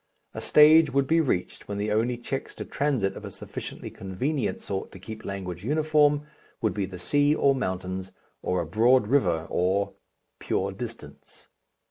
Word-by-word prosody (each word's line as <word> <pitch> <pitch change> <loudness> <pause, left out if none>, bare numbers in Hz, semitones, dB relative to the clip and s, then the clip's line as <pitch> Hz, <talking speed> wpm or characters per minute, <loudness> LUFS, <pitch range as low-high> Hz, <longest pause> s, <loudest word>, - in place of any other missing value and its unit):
A - - -5
stage 155 0 +6
would 140 +1 +2
be 165 +4 +3
reached 125 - -2
when 100 - -4
the 105 +1 -1
only 115 +3 +1
checks 130 +3 -5
to - - -6
transit 130 -10 0
of - - -9
a - - -6
sufficiently - - -7
convenient 125 +10 -2
sort 95 -1 -4
to 95 - -10
keep 110 +3 -9
language 90 -3 -5
uniform 150 +1 +3 0.3
would 110 - 0
be 100 -2 -2
the 95 -1 -8
sea 145 - +2
or 140 -2 +4
mountains 95 -5 -3 0.3
or 90 -1 0
a - - -3
broad 115 +8 +4
river 90 - +2
or 95 +3 +1 0.5
pure 95 +1 -1
distance. 115 +4 -9
110 Hz, 165 wpm, -26 LUFS, 95-140 Hz, 0.5 s, stage